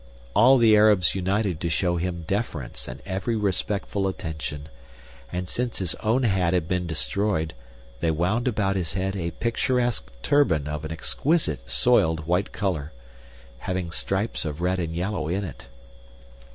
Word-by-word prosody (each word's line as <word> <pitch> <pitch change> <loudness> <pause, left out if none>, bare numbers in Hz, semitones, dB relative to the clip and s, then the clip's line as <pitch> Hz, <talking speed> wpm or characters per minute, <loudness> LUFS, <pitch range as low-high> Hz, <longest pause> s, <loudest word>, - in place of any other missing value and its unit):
All 130 +5 +7
the 115 -3 +6
Arabs 105 -4 +5
united 95 -2 0
to 85 - -1
show 85 +1 +1
him 85 -1 -3
deference 75 - -3
and - - -8
every 95 +4 -1
respectful 100 -1 -1
attention, 80 -5 -5 0.6
and 90 0 -3
since 120 +4 -2
his 90 -4 -1
own 115 +4 +1
hat 95 -5 +2
had 85 -3 0
been 90 -1 -1
destroyed 80 - -1 0.5
they 85 - +1
wound 90 +10 +1
about 100 -5 +1
his 90 -4 -2
head 95 +1 -1
a 85 -3 -2
picturesque 120 - 0
turban 85 - +3
of 75 +1 -4
an 80 - -5
exquisite 80 - 0
soiled 80 0 +3
white 90 +5 +1
color, 80 -8 -2 0.7
having 90 -2 -3
stripes 95 +6 -1
of 75 -1 -4
red 90 +2 0
and 80 -2 -3
yellow 90 -2 -2
in 95 +5 -1
it. 80 -8 -8
90 Hz, 150 wpm, -25 LUFS, 80-105 Hz, 0.7 s, All